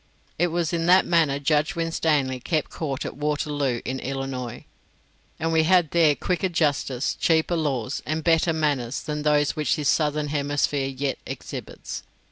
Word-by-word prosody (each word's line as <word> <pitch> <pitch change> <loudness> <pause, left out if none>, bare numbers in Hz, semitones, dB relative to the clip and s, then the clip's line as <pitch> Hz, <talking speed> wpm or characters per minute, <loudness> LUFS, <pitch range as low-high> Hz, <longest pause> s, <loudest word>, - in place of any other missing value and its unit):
It 175 - +4
was 170 0 -1
in 165 0 0
that 185 +1 +6
manner 160 -5 +3
Judge 150 +5 +1
Winstanley 155 -5 0
kept 155 +4 -1
court 140 -4 -3
at - - -5
Waterloo 145 -4 -1
in 130 +1 -3
Illinois, 130 -3 -5 0.7
and 165 +1 0
we 160 - +5
had 175 -1 +3
there 160 -4 +4
quicker 180 +6 -1
justice, 145 -5 0
cheaper 165 +1 +2
laws, 140 -6 -1
and 155 +1 -2
better 165 0 +3
manners 145 -6 -1
than 150 -1 -3
those 150 -1 +2
which 155 -1 +1
this 150 -2 0
southern 150 -1 +1
hemisphere 145 -1 0
yet 135 0 -3
exhibits. - - -7
150 Hz, 155 wpm, -24 LUFS, 140-165 Hz, 0.7 s, that